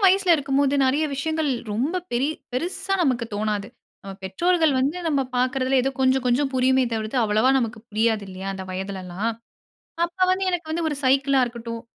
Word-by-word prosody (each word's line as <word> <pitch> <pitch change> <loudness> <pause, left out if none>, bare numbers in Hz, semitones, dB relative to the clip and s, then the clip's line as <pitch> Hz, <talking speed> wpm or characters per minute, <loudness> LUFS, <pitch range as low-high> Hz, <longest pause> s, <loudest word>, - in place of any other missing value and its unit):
வயசில 380 -1 +5
இருக்கும்போது 280 -1 +1
நிறைய 280 +4 +2
விஷயங்கள் 315 +2 -1 0.2
ரொம்ப 275 - -1 0.2
பெரி 245 +3 +1 0.3
பெரிசா 355 +7 -2
நமக்கு 250 -5 +1
தோணாது. 210 -1 -2 0.3
நம்ம 195 0 -8
பெற்றோர்கள் 320 - +2
வந்து 280 +7 0
நம்ம 285 -4 +2 0.2
பார்க்கிறதில 255 +1 +1
ஏதோ 270 - 0
கொஞ்சம், 260 0 +3
கொஞ்சம் 265 +3 +2
புரியுமே 260 0 +3
தவிர்த்து 220 +3 -2
அவ்வளவா 215 +4 +3
நமக்கு 225 -4 -2
புரியாது 220 -1 +1
இல்லயா! 190 +1 -6
அந்த 190 0 -6
வயதிலல்லாம். 190 +2 -3 0.7
அப்போ 360 +2 0
வந்து 380 +1 0
எனக்கு 345 -3 -3
வந்து 330 0 -1
ஒரு 295 - -3
சைக்கிளா 270 +1 +3
இருக்கட்டும், 230 -1 -6
260 Hz, 160 wpm, -23 LUFS, 220-295 Hz, 0.7 s, வயசில